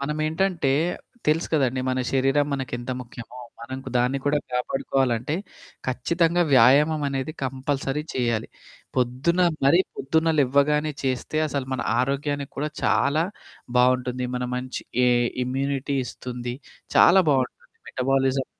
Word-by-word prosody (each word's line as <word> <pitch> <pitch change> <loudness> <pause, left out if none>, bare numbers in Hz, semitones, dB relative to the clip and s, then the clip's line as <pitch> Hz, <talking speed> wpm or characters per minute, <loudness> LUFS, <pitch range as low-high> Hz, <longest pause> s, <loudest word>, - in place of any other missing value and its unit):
మనమేంటంటే 155 +2 0 0.6
తెలుసు 155 +3 +2
కదండీ. 130 -4 +1
మన 130 - -1
శరీరం 135 +2 +2
మనకెంత 130 -2 -4
ముఖ్యమో. 120 0 -10 0.2
మనకు 130 +3 -7
దాన్ని 125 +3 +1
కూడా 145 +1 +2
కాపాడుకోవాలంటే 125 +1 0 0.5
ఖచ్చితంగా 170 +7 +1
వ్యాయామం 140 +5 +5
అనేది 135 +2 -3
కంపల్సరీ 135 +2 -2
చేయాలి. 120 -3 0 0.5
పొద్దున 130 +8 +1 0.3
మరీ 145 +6 +6 0.2
పొద్దున్న 160 +4 +1
లెవ్వగానే 145 +3 +2
చేస్తే 130 +3 -2
అసలు 140 -3 -3
మన 130 - -3 0.2
ఆరోగ్యానికి 140 +2 -1
కూడా 150 +2 -2
చాలా 155 +3 +2 0.5
బావుంటుంది. 125 0 +2
మన 125 0 -2
మంచి 125 +1 -4 0.3
ఏ - - +5 0.4
ఇమ్యూనిటీ 140 +2 -1
ఇస్తుంది 125 -1 -6 0.4
చాలా 190 +2 +7
బావుంటుంది 130 -3 -2
మెటబాలిజం 135 0 +1
135 Hz, 115 wpm, -24 LUFS, 125-150 Hz, 0.6 s, చాలా